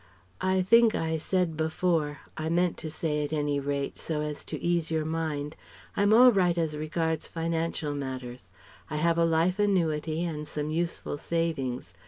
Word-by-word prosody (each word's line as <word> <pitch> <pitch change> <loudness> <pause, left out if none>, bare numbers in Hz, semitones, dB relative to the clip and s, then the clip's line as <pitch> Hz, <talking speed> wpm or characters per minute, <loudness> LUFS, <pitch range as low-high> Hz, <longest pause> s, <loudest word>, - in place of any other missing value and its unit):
"I 185 0 +2
think 230 +3 +5
I 160 0 0
said 175 0 0
before 160 -1 0
I 155 0 -3
meant 175 +1 +2
to 160 - -6
say, 150 -1 -1
at 145 - -4
any 145 -2 0
rate, 140 0 -3
so 155 -2 -2
as 150 -1 -4
to - - -5
ease 170 -2 0
your 160 -1 0
mind: 155 -2 -2 0.4
I'm 205 +1 +3
all 245 +3 +8
right 180 -5 +2
as 160 -2 0
regards 160 +1 -2
financial 165 -2 -2
matters. 130 -3 -6 0.4
I 150 - -4
have 170 +2 +2
a 170 - +5
life 165 +4 +2
annuity 165 -5 +1
and 150 -3 -4
some 150 0 -3
useful 165 -3 -2
savings. 155 -7 -2
160 Hz, 170 wpm, -28 LUFS, 150-170 Hz, 0.4 s, all